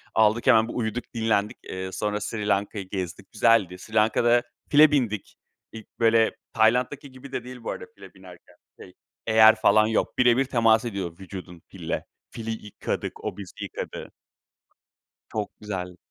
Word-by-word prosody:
Aldık 110 +1 +3
hemen 110 0 +6
bir - - -6
uyuduk, 120 +1 -2
dinlendik. 110 -3 0
Eee, 95 0 -6
sonra 105 +2 -2
Sri 105 0 -4
Lanka'yı 100 -1 -1
gezdik, 95 0 -5
güzeldi. 105 -5 +3
Sri 110 +4 -13
Lanka'da 120 +2 +3 0.3
file 150 +1 +7
bindik. 115 -8 -1 0.4
İlk, 110 -1 -13
böyle, 115 -1 +3 0.2
Tayland'daki 125 +5 +1
gibi 130 +1 -12
de 125 - -4
değil 125 -1 -10
bu - - -3
arada - - -7
file - - -14
binerken, - - -16 0.3
şey, - - -13 0.3
eyer 110 0 +7
falan 110 -1 +4
yok. 110 - -1
Bire 120 -1 +5
bir 135 - +2
temas 115 -2 +3
ediyor 95 -7 -4
vücudun 90 -2 -9
fille. 85 -4 -5 0.3
Fili 115 -1 -6
yıkadık, 105 - -5
o - - -4
bizi 100 -3 -9
yıkadı. - - -7 1.2
Çok 105 -2 -3
güzel. 90 -4 -5
110 Hz, 155 wpm, -25 LUFS, 100-120 Hz, 1.2 s, file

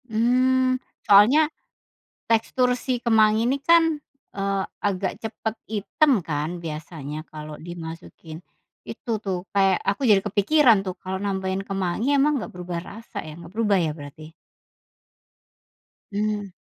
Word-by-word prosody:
Mmm. 255 +3 +2 0.2
Soalnya 255 +11 +6 0.8
tekstur 230 +2 +2
si 250 0 -2
kemangi 220 -1 +4
ini 265 +3 +1
kan, 325 -1 +4 0.3
eee, 195 -1 -1 0.2
agak 195 -2 -1
cepet 220 0 -4
item 220 +8 +2
kan 150 -1 -2 0.2
biasanya 155 -1 -6
kalau 155 0 -8
dimasukin 165 -1 -9 0.4
itu - - -8
tuh 185 -2 -3
kayak, 195 -2 +4
aku 200 +7 0
jadi 205 - +7
kepikiran 215 +2 +4
tuh 185 -2 -6
kalau 190 +2 -5
nambahin 190 -1 -2
kemangi 195 +8 0
emang 295 +2 +3
enggak - - -6
berubah 180 -1 -5
rasa 215 +1 -8
ya, 155 +1 -9
enggak 170 0 -12
berubah 210 -3 +2
ya 160 -3 0
berarti? 155 +1 -11 1.8
Mmm. 205 -1 -2
200 Hz, 125 wpm, -24 LUFS, 175-230 Hz, 1.8 s, jadi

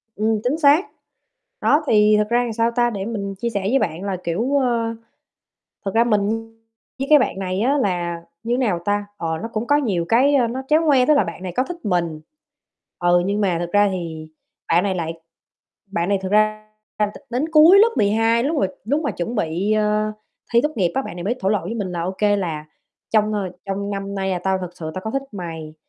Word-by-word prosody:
Ừm, 215 +1 +1
chính 265 +6 0
xác. 300 +4 +5 0.8
Đó, 300 +2 +3
thì 210 -1 +5
thực 210 +1 0
ra 240 +1 +3
thì, 230 -2 -3
sao 230 +1 +1
ta, 240 0 +2
để 200 -3 -4
mình 200 -3 -4
chia 235 +5 -3
sẻ 200 -3 -2
với 240 +8 +2
bạn 170 +3 -2
là, 195 -2 -2
kiểu, 225 +12 -1
ơ, 230 -3 0 0.9
thật 195 - -1
ra 230 - +5
mình 210 -3 +1 0.7
với 270 - -2
cái 300 -1 +8
bạn 195 - -1
này 185 +1 -2
á 275 +5 +2
là, 175 -6 -1 0.2
như 235 +1 -1
thế - - +1
nào 210 -10 +1
ta, 205 0 0
ờ, 160 -1 -2
nó 225 - -3
cũng 225 0 -3
có 290 - +4
nhiều 200 -12 0
cái, 275 +5 +4
a, 245 -3 +3
nó 255 +3 -4
tréo 310 +2 +4
ngoe. 265 -4 +4
Tức 305 - +5
là 250 - +4
bạn 170 +1 -7
này 180 - -4
có 255 - +2
thích 350 +4 -7
mình, 170 -5 -1 0.8
ừ, 175 0 +3
nhưng 205 +2 0
mà 180 -4 +1
thực 175 0 -4
ra 205 0 +4
thì 160 -4 -5 0.4
bạn 175 +3 +3
này 190 -2 0
lại 165 -1 -3 0.7
bạn 180 -1 -2
này 200 - +3
thực 190 +1 -4
ra 215 0 +2 0.3
t - - -4 0.3
đến 255 +5 -1
cuối 330 +5 +8
lớp 455 +2 +6
12, 225 +3 +2
lúc 305 +2 0
mà 195 - +2 0.2
lúc 290 +6 +1
mà 290 - -1
chuẩn 225 +8 -4
bị, 185 +2 -1
ờ, 215 0 +1 0.4
thi 235 - +5
tốt 300 - +2
nghiệp 180 -5 +1
á, 270 - +2
bạn 175 - -8
này 175 - -6
mới 235 +5 0
thổ 190 - 0
lộ 210 -2 +2
với 230 - -4
mình 195 -5 -3
là: 170 -1 -3
"OK, 190 +3 -5 0.2
là 160 -5 -3 0.4
trong, 215 -1 +2
ờ, 195 -3 -2 0.2
trong 200 +1 -3
năm 200 0 -4
nay 190 0 -1
là 180 - -1
tao 190 +1 0
thực 180 -1 -8
sự 160 -1 -5
tao 185 - -5
có 220 - -4
thích 275 - -1
mày, 165 -5 -7
210 Hz, 235 wpm, -21 LUFS, 185-240 Hz, 0.9 s, cái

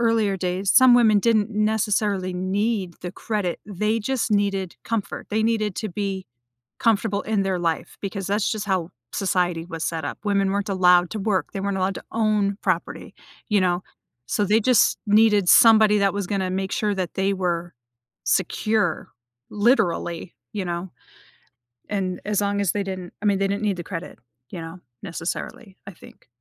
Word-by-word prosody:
earlier 225 -4 +2
days, 185 +2 0
some 260 -1 +7
women 220 -4 +5
didn't 220 -1 +2
necessarily 210 -3 0
need 190 0 -1
the 180 0 -5
credit- 205 -6 -3
they 210 +3 -1
just 245 0 -1
needed 195 -3 0
comfort. 220 -3 -3
They 220 +1 +1
needed 215 -4 0
to 215 - -3
be 195 0 -3 0.6
comfortable 215 -2 +1
in 210 -2 0
their 190 -2 -1
life 165 -2 -2
because 195 -1 -4
that's 205 +1 0
just 210 -2 -3
how 185 -4 -1 0.2
society 180 -3 0
was 165 -2 -6
set 165 -1 -3
up. - - -4
Women 200 -1 +1
weren't 200 +1 -2
allowed 180 -2 +4
to 220 - -4
work, 200 -2 -1
they 195 - -3
weren't 200 -1 -1
allowed 190 +1 0
to - - -7
own 210 -3 +1
property, - - -2 0.3
you 205 -2 +3
know? 180 0 +1 0.4
So, 205 - 0
they 210 +3 +3
just 245 0 +3
needed 210 -3 +4
somebody 220 -3 +7
that 195 -1 +2
was 200 -3 -3
gonna 190 -2 -1
make 190 +1 -2
sure 210 -1 0
that 185 -3 -3
they 195 +1 +1
were 175 -3 -2 0.5
secure, 200 -1 0 0.4
literally, 200 -6 0 0.2
you 200 -3 -3
know? 175 +1 -4 1.0
And 190 -3 -2
as 210 -1 0
long 200 0 0
as 195 - +1
they 205 - -1
didn't 185 -2 -6
I - - -5
mean, 200 -2 +2
they 195 - +2
didn't 200 +2 -2
need 200 -3 0
the 175 - -5
credit, 170 0 -7 0.3
you 170 - -6
know, 165 +2 -8 0.2
necessarily, 195 +5 -6
I - - -6
think. 165 - -17
200 Hz, 175 wpm, -23 LUFS, 185-210 Hz, 1.0 s, some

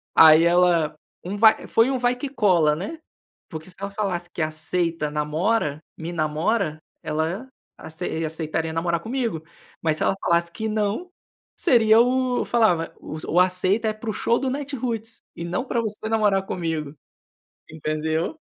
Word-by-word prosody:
Aí 160 0 +8
ela 170 -3 +3 0.3
um 185 +3 -4
vai 220 +1 +5
foi 230 +3 +3
um 265 - 0
vai 245 0 +1
que 270 +3 -5
cola, 180 - +3
né, 200 - -6 0.5
porque 160 +1 -8
se 180 - -13
ela 200 0 -4
falasse 190 -4 -3
que - - -4
aceita 155 0 -1
namora, 150 +2 0 0.2
me 165 +2 -6
namora, 155 +3 0 0.3
ela 160 +10 -2 0.3
acei 160 0 -4
aceitaria 160 0 -2
namorar 170 +1 0
comigo, 230 -7 -3 0.4
mas 155 -1 +1
se - - -1
ela - - +2
falasse 170 0 +1
que 220 +4 -4
não, 215 - -1 0.5
seria 225 -8 +5
o 250 0 +1
falava, 195 -9 +2
o 155 +2 -2
aceita 185 +4 +2
é - - -2
para 215 +1 -7
o - - -1
show 235 +4 +1
do 265 - -1
Natiruts 250 -5 -4 0.2
e 170 - -6
não 175 +9 -2
para 235 -3 -1
você 215 0 -4
namorar 205 -3 +2
comigo, 160 -6 -3 0.8
entendeu? 160 - -2
180 Hz, 155 wpm, -23 LUFS, 160-225 Hz, 0.8 s, Aí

